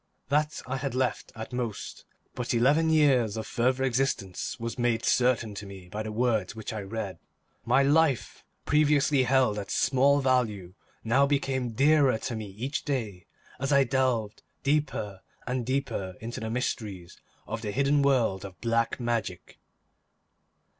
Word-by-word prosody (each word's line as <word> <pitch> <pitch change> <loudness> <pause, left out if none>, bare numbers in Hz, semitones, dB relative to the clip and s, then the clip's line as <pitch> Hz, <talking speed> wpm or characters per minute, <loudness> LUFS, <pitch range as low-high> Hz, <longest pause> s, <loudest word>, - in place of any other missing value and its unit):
That 150 +2 0
I 135 +1 -3
had 135 -1 -3
left 130 -4 -1
at 110 +2 -7
most 120 -4 -4 0.3
but 125 -1 -2
eleven 145 +7 +3
years 135 -9 +3
of 110 - -4
further 130 +2 0
existence 125 -7 -1
was 115 +1 -5
made 120 -1 +1
certain 125 -4 +2
to 100 0 -7
me 95 -2 -11
by 105 +4 -4
the 110 0 -4
words 115 0 0
which 110 0 -6
I 110 - -4
read. 100 -3 -5 0.5
My 140 - +4
life, 145 -2 +2 0.2
previously 145 -2 +3
held 125 -5 +2
at 100 - -7
small 135 +3 +3
value, 115 -9 0 0.3
now 135 +5 +3
became 135 -4 -1
dearer 140 -1 +4
to 120 +1 -4
me 110 -1 -5
each 120 +9 -4
day, 110 - -3 0.3
as 135 +2 -1
I 140 -1 +6
delved 125 -5 0 0.2
deeper 135 -9 -1 0.2
and 125 -1 -2
deeper 130 -9 -2
into 115 +2 -6
the 110 - -4
mysteries 105 -7 -4 0.2
of 115 +1 -5
the 105 - -4
hidden 140 +6 +2
world 120 -9 +2
of 95 -2 -10
black 115 +1 0
magic. 115 -6 -3
120 Hz, 155 wpm, -28 LUFS, 110-135 Hz, 0.5 s, I